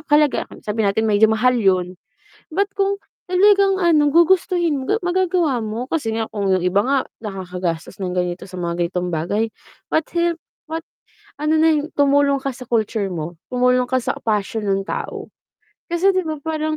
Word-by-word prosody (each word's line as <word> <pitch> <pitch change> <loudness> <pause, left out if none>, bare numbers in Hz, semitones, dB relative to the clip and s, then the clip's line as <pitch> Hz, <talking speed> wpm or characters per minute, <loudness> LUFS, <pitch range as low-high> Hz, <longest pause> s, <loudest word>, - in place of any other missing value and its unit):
halaga 295 -1 +3 0.2
sabihin 210 0 0
natin 220 +3 +1
medyo 215 +1 +5
mahal 245 +3 +2
yun. 185 -3 +1 0.6
Ba't 400 +2 +1
kung 395 0 +1 0.3
talagang 390 +1 +4
ano, 305 -5 +3
gugustuhin 345 -1 +3
mo, 265 - -4
ga 430 +10 0
magagawa 350 -9 +1
mo 225 +4 -4
kasi 280 -9 -1
nga 225 0 -2
kung 200 -3 -1
yung 185 - +2
iba 180 +3 +2
nga, 275 +2 +2 0.3
nakakagastos 180 -4 -4
ng 180 -1 -2
ganito 180 0 -2
sa 185 -1 -8
mga 170 -1 -2
ganitong 180 +1 -2
bagay, 175 +6 -1 0.4
ba't 315 - +1
help 340 -1 +1 0.3
ba 325 +1 -3 0.6
ano 305 +1 +2
na 320 +1 +5
yung 300 +1 -2
tumulong 280 0 +3
ka 275 - -1
sa 250 0 -10
culture 220 -3 0
mo, 170 -1 -5
tumulong 250 0 +2
ka 260 +1 +1
sa - - -1
passion 215 0 -1
ng 195 0 +1
tao. - - -5 0.6
Kasi 345 +3 +3
di 370 - +1
ba 315 -1 -3
parang 310 0 -2
250 Hz, 175 wpm, -20 LUFS, 195-320 Hz, 0.6 s, medyo